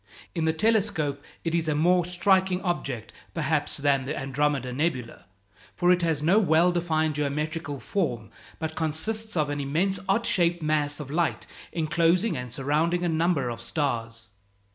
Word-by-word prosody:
In 165 -3 -1
the 160 - +3
telescope 195 -6 +1 0.2
it 165 - -2
is 165 -1 +1
a 155 - +1
more 175 +3 +3
striking 185 +1 +2
object, 140 - -3 0.2
perhaps, - - +1
than 140 -2 +1
the 150 +3 -3
Andromeda 135 -1 -1
nebula; 130 -4 -2 0.5
for 175 0 +3
it 180 0 +3
has 160 -3 0
no 180 +7 +5
well 175 -2 +4
defined 160 -3 0
geometrical 150 0 -2
form, 120 - -2 0.3
but 160 -1 -4
consists 205 +7 -2
of 150 -2 +1
an 145 - -3
immense 175 +8 0
odd 225 +4 +2
shaped 175 -2 +2
mass 150 -1 0
of 145 -2 -7
light 165 +1 0 0.3
enclosing 170 +4 +2
and 125 -2 -5
surrounding 155 +7 +1
a - - +1
number 160 -5 +1
of 115 - -7
stars. 115 -7 -3
160 Hz, 160 wpm, -26 LUFS, 145-175 Hz, 0.5 s, no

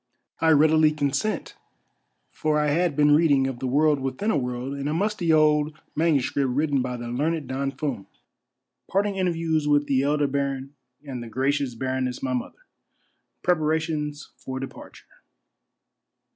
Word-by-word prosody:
I 160 - +3
READILY 155 0 +5
CONSENT, 145 +8 -2 0.8
FOR 155 -1 0
I 150 0 +1
HAD 165 +1 +1
BEEN 150 0 +4
READING 145 -4 +4
OF 135 -2 -3
THE 130 - -2
WORLD 145 +2 +3
WITHIN 135 +11 -2
A - - +1
WORLD 125 0 -2
IN 140 0 -4
A 150 - -1
MUSTY 195 -2 0
OLD 150 -1 +3 0.2
MS. 155 -5 +1
WRITTEN 140 +1 +1
BY 125 -1 -3
THE 120 0 -6
LEARNED 150 +4 -1
DON 135 +1 -2
FUM. 135 -6 -4 0.4
— - - -58
PART 195 +2 +2
ING 200 -1 -2
INTERVIEWS 165 -4 0
WITH 145 0 +3
THE 135 -2 +2
ELDER 145 +1 +1
BARON 140 0 -2 0.3
AND 130 -4 -6
THE 120 - -8
GRACIOUS 135 +1 0
BARONESS 130 +1 -2
MY 130 -1 -1
MOTHER. 125 - -5 0.4
— - - -49
PREPARATIONS 155 -3 -1
FOR 130 0 -6
DEPARTURE. 135 - -10
145 Hz, 160 wpm, -25 LUFS, 135-155 Hz, 0.8 s, READILY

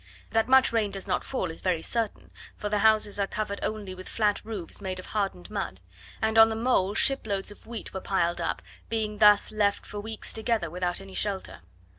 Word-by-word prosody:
That 225 0 +2
much 265 -1 +5
rain 220 -3 +2
does 195 -1 -6
not - - -1
fall 190 -11 -2
is 160 - -9
very 175 -3 0
certain, 230 -3 -3 0.3
for 210 - -3
the 210 0 +1
houses 215 -1 +4
are 200 - +1
covered 200 -1 -3
only 210 -3 -3
with 185 0 -9
flat 210 -2 +1
roofs 210 -4 -5
made 190 -2 -4
of 185 - -7
hardened 195 - -3
mud; 95 - -3 0.4
and 220 0 +3
on 225 0 +9
the 220 - -2
mole 220 -4 +1
shiploads 210 -8 +2
of 205 - -14
wheat 230 -1 -6
were 190 - -4
piled 175 -3 0
up, - - -2 0.3
being 215 -2 -2
thus 210 -1 +6
left 205 -2 +1
for 205 - -6
weeks 220 +1 -4
together 220 -7 -1
without 180 +1 -1
any 195 0 -11
shelter. 195 -1 -3
205 Hz, 205 wpm, -27 LUFS, 190-220 Hz, 0.4 s, on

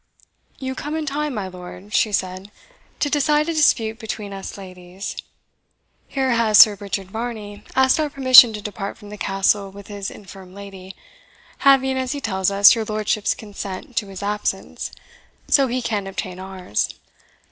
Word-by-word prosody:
"You 260 -1 -4
come 295 +4 -5
in 315 -1 -2
time, 295 -1 -2
my 200 -3 -3
lord," 185 +2 -11
she 215 - +2
said, 185 0 -3 0.5
"to - - +2
decide 295 +1 +2
a 335 - -1
dispute 225 -8 +2
between 215 -3 -6
us 195 +1 -7
ladies. 185 0 -8 0.9
Here 265 -2 -1
has 230 -3 +3
Sir 205 +3 +9
Richard 195 -2 -5
Varney 220 -3 -6
asked 265 +3 +4
our 305 -1 0
permission 255 -4 +8
to 210 -1 -7
depart 200 -1 -5
from 205 -2 -13
the 210 - -8
Castle 195 0 +1
with 200 +1 -13
his 200 -1 -5
infirm 190 -2 -13
lady, 195 -2 -10 0.6
having, 265 -1 +4
as 260 +1 -2
he 285 - -4
tells 190 -7 0
us, 200 0 +7
your 225 -2 -2
lordship's 215 0 -1
consent 205 +1 -8
to 210 - 0
his 195 0 -8
absence, 210 +1 -3 0.6
so 275 -2 +4
he 250 0 -2
can 205 -4 -2
obtain 185 -1 -5
ours. 185 - -3
210 Hz, 165 wpm, -21 LUFS, 195-255 Hz, 0.9 s, Sir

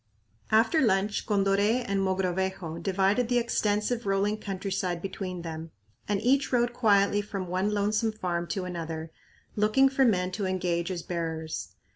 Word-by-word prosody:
After 225 +9 +4
lunch, 205 -2 +1
Condoré 205 +4 +2
and 200 0 0
Mogrovejo 190 -2 -1
divided 195 +6 +1
the 245 - +3
extensive 225 -1 0
rolling 200 +2 +1
countryside 190 -3 -3
between 185 -1 -5
them 165 0 -6 0.4
and 205 -1 +1
each 275 +3 +2
rode 240 -1 +2
quietly 205 -3 +3
from 200 -2 -5
one 185 +3 0
lonesome 210 +2 +1
farm 175 -5 -2
to 190 -1 -3
another, 165 -2 -5 0.4
looking 215 +6 +4
for 270 0 +2
men 185 -6 +2
to 195 +1 -2
engage 180 -2 -1
as 180 -3 -4
bearers. 160 -2 -4
195 Hz, 145 wpm, -28 LUFS, 180-215 Hz, 0.4 s, After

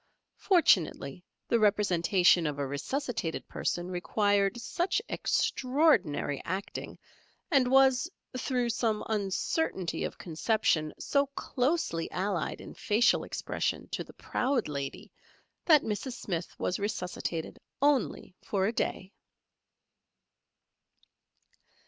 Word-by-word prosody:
Fortunately, 180 - +2 0.2
the 235 - +2
representation 185 -4 +3
of 145 -1 -3
a 140 - -1
resuscitated 165 - -3
person 175 +1 -2
required 200 +3 +1
such 350 - 0
extraordinary 240 - +1
acting, 190 +3 -5 0.5
and 265 -5 +4
was, 265 +3 +4 0.3
through 250 -1 0
some 225 -2 0
uncertainty 195 - -1
of - - -4
conception, 165 -2 0
so 280 0 +1
closely 250 - -1
allied 185 -3 -2
in - - -10
facial 225 +3 +2
expression - - -3
to - - -3
the - - -15
Proud 255 -2 -1
Lady, 140 -2 -5 0.5
that 310 -4 +6
Mrs. 225 +4 -3
Smith 175 -8 -4
was 180 - -1
resuscitated 180 -5 -3 0.2
only 275 -8 +1
for 190 -2 0
a 220 - 0
day. 190 -3 -2
205 Hz, 100 wpm, -30 LUFS, 175-255 Hz, 0.5 s, that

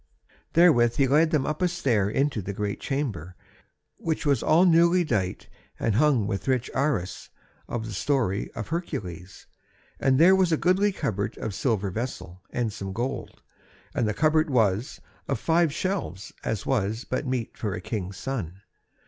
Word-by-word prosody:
Therewith 120 -9 +5
he 140 - +3
led 155 +5 +4
them 150 -4 +1
up 150 +3 -3
a 180 - +4
stair 125 - +1
into 135 0 0
the 100 +2 -5
great 100 0 -3
chamber, 105 - -3 0.6
which 160 -2 -2
was 140 -5 +2
all 165 +4 +4
newly 170 +1 +5
dight 95 - -2 0.3
and 115 - +1
hung 130 -2 +3
with 100 +2 -3
rich 130 -2 0
arras 125 -10 -1 0.4
of 115 -2 -3
the 110 - -6
Story 110 -3 0
of 115 - -5
Hercules; 95 - -5 0.5
and 135 -1 +3
there 175 +6 +7
was 185 -2 +2
a 160 - +3
goodly 190 +5 +3
cupboard 105 - -3
of 110 - -4
silver 100 -3 0
vessel, 95 -5 -5
and 115 -4 -2
some 95 -1 -5
gold, 125 +6 -4 0.5
and 120 - 0
the 105 - -1
cupboard 155 0 +3
was 110 0 +1 0.3
of 135 -5 -1
five 165 +1 +2
shelves 175 - -3
as 105 -3 -2
was 110 -3 0
but 130 +2 -2
meet 125 -3 -2
for 105 -4 -3
a - - -5
king's 95 -1 -5
son. 100 -8 -5
125 Hz, 165 wpm, -26 LUFS, 100-155 Hz, 0.6 s, there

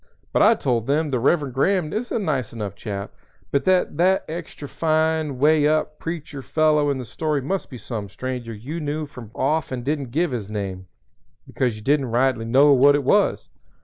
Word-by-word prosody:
But - - +3
I 220 +3 +6
told 120 - -1
them 150 +2 +1
the 125 - +1
Reverend 140 +1 +1
Graham 165 +3 +1
is 240 +3 -3
a - - 0
nice 150 - -1
enough 105 -4 -4
chap, 100 -1 -6 0.4
but 140 - +1
that 185 -5 +2
that 185 +3 +3
extra 160 -2 -7
fine, 155 -2 0
way 150 +2 +4
up 155 0 0
preacher 155 -4 -5
fellow 150 0 +2
in 140 - 0
the 130 - -5
story 150 +5 -1
must 180 +9 -3
be 125 - -8
some 110 -4 -6
stranger 125 +2 -5
you 125 +10 -6
knew 150 0 -3
from 125 -6 -11
off 145 +2 0
and 125 -2 -4
didn't 140 -3 -2
give 160 +5 0
his 110 -5 -4
name, 95 -3 -5 0.6
because 125 -4 -1
you 110 - -11
didn't 140 +1 +2
rightly 120 -1 +1
know 135 +5 +5
what 140 +2 +6
it 145 - 0
was. - - +2
140 Hz, 195 wpm, -23 LUFS, 125-155 Hz, 0.6 s, I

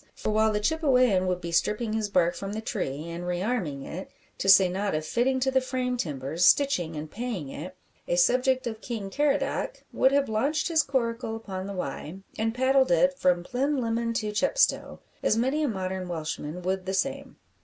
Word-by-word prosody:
For - - -2
while 220 +1 +3
the 210 - 0
Chippewayan 250 - +2
would 180 -1 -1
be 170 0 -5
stripping 210 +6 0
his 220 -2 -1
bark 175 -3 +2
from 195 +3 -6
the 215 - -3
tree, 160 - -4
and 170 +1 -6
re 175 0 -1
arming 175 - -2
it 185 +6 -7 0.3
to 195 - 0
say 190 -1 +8
nought 195 0 -2
of 155 0 -2
fitting 260 +7 +1
to 265 +1 +2
the 260 0 +3
frame 255 -1 -2
timbers, 150 - -2
stitching, 180 - +3
and 150 0 -6
paying 220 - -4
it 180 +7 -7 0.3
a - - +1
subject 255 +8 +3
of 220 -2 -5
King 215 -5 -5
Caradoc 285 0 0
would 265 - +4
have 280 0 +2
launched 280 +10 0
his 320 -2 +4
coracle 235 -4 -2
upon 195 -4 -6
the 200 - -5
Wye, 170 -1 -5 0.2
and 225 +1 -1
paddled 260 +1 +3
it 270 +11 +3
from 175 -1 +2
Plinlimmon 235 -2 -1
to 215 -2 -1
Chepstow; - - +1 0.2
as 215 - +2
many 265 +6 +1
a 300 - +1
modern 190 -4 -3
Welshman 160 0 -4
would 185 0 -2
the 190 - -1
same. 275 +7 -2
215 Hz, 195 wpm, -27 LUFS, 180-255 Hz, 0.3 s, say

